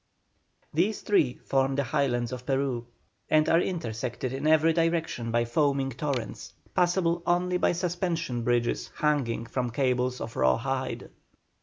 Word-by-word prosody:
These 190 +7 +1
three 150 -12 +2
form 135 0 0
the 140 - +1
Highlands 120 -2 0
of 125 -1 -7
Peru, 135 -3 -1 0.4
and 155 0 +4
are 165 +1 +4
intersected 125 - -3
in 135 +3 -2
every 160 +1 +5
direction 165 -8 0
by 120 +1 +1
foaming 135 +2 +1
torrents, 130 -1 -4 0.2
passable 175 -1 +2
only 180 +1 +2
by - - +2
suspension 170 -7 -2
bridges 120 0 0
hanging 135 -7 0
from 125 +1 -2
cables 125 0 0
of 115 - -6
raw 65 0 +3
hide. 130 +1 -3
135 Hz, 140 wpm, -27 LUFS, 120-165 Hz, 0.4 s, every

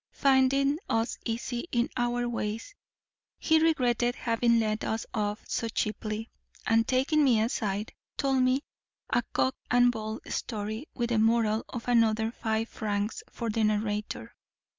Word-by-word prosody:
Finding 275 +1 +3
us 225 +1 0
easy 240 +4 -3
in 240 0 +2
our 240 0 0
ways, 225 - -3 0.6
he 320 -1 +3
regretted 245 -7 +2
having 235 -1 +2
let 215 -1 0
us 220 0 -2
off 210 -1 -2
so 230 - -1
cheaply; 215 0 -3 0.3
and 225 +1 +3
taking 270 +4 +3
me 245 -5 +4
aside, 215 -2 -1 0.2
told 270 -2 +2
me 255 +3 +2 0.5
a - - +3
cock 260 - +2
and 245 0 +5
bull 220 -1 -5
story 220 +4 -4
with 240 -2 -1
the 225 - +3
moral 225 -1 +3
of 240 -1 -6
another 225 -2 +3
five 225 -1 -1
francs 205 0 -2
for 230 -2 -3
the 225 +1 0
narrator. 210 0 -1
230 Hz, 140 wpm, -29 LUFS, 220-250 Hz, 0.6 s, and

